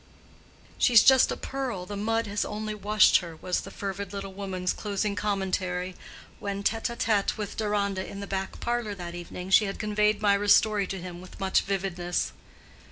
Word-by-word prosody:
"She's 235 -4 +7
just 265 -1 +6
a - - -3
pearl; 255 -9 -4
the 205 - -6
mud 225 +3 0
has 205 0 -1
only 215 0 -4
washed 210 +1 +5
her," 170 -2 -6
was 180 +3 -2
the - - -9
fervid 200 -1 -5
little 195 -1 -5
woman's 190 -2 -2
closing 205 0 -2
commentary 185 -3 -1 0.4
when, 200 0 -4
tête 225 +3 0
à - - -18
tête 210 -3 +1
with 210 -2 -5
Deronda 200 -3 0
in 200 - -8
the 200 - -5
back 195 -1 -4
parlor 235 -3 -2
that 175 -2 -7
evening, 180 +2 -7
she 210 +2 +7
had 195 - -4
conveyed 210 0 +1
Mirah's 205 -1 +5
story 210 -3 +2
to 195 - -4
him 175 0 -8
with 185 - -13
much 190 -1 +2
vividness. 180 -3 -2
200 Hz, 180 wpm, -27 LUFS, 190-210 Hz, 0.4 s, She's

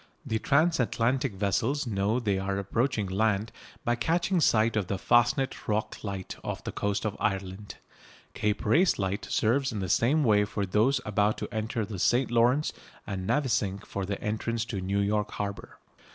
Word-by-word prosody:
The 110 - -1
transatlantic 135 -5 +1
vessels 115 +9 0
know 105 +1 0
they 100 -5 0
are 95 0 -2
approaching 110 +3 0
land 105 +2 0 0.3
by 120 - +2
catching 170 +8 +1
sight 115 -4 +3
of 105 -4 0
the 100 - -2
Fastnet 120 +6 +2
Rock 105 0 -2
light 100 -3 -5
off - - -4
the - - -4
coast 100 +1 -2
of 105 - -1
Ireland. 95 0 -3 0.6
Cape 105 0 -1
Race 165 - +4
light 100 +1 -2
serves 130 +5 +1
in 110 - -4
the 95 -2 -3
same 145 - +3
way 105 -4 +4
for 100 0 -2
those 110 +9 +2
about 105 0 +1
to - - -6
enter 110 0 -2
the 100 -3 -6
St 120 +6 +2
Lawrence 120 +6 +3 0.3
and 95 -2 -4
Navesink 105 -8 0
for 100 - -4
the 100 - -3
entrance 110 +2 -2
to 100 -5 -4
New 100 +2 0
York 105 +1 0
harbour. 100 -1 -5
110 Hz, 170 wpm, -28 LUFS, 100-120 Hz, 0.6 s, Race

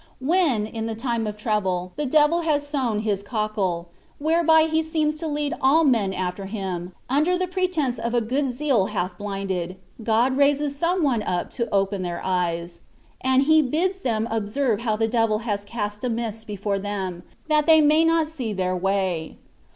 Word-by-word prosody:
When, 275 - +2
in 225 +1 -4
the 225 - -3
time 230 -1 -2
of 210 0 -5
trouble, 190 -5 -1
the 295 -1 -2
devil 305 +4 +4
has 300 -3 0
sown 260 -8 -1
his 205 -3 -1
cockle, 200 -5 -2 0.3
whereby 320 +1 +4
he 320 0 +1
seems 310 -1 0
to 325 - -4
Isad 295 +1 -1
all 290 +5 +5
men 230 -9 +2
after 185 +1 -3
him, 185 -4 -4
under 305 +7 +2
the 370 - 0
pretence 355 -9 -1
of 235 +1 -2
a - - +4
good 265 +5 0
zeal 250 -6 +1
half 180 +1 -3
blinded, 190 -3 -4 0.3
God 235 +4 +2
raises 285 0 +2
some 345 +4 0
one 250 -6 +2
up 180 -4 -2
to 235 -2 -3
open 195 0 +1
their 175 -1 -3
eyes; 170 -2 -1 0.4
and 260 +1 +4
He 315 +2 +5
bids 340 +8 0
them 225 -7 -1
observe 225 +2 0
how 230 -2 0
the 225 +1 +1
devil 225 -2 +2
has 205 -3 -1
cast 210 0 -5
a 250 - 0
mist 225 -1 -4
before 205 -1 -2
them, 190 -3 -4 0.3
that 305 -1 +2
they 320 -1 +7
might 310 +2 +4
not 330 -1 +2
see 260 -9 -4
their 185 -1 -1
way. 185 -3 -1
230 Hz, 180 wpm, -24 LUFS, 200-295 Hz, 0.4 s, they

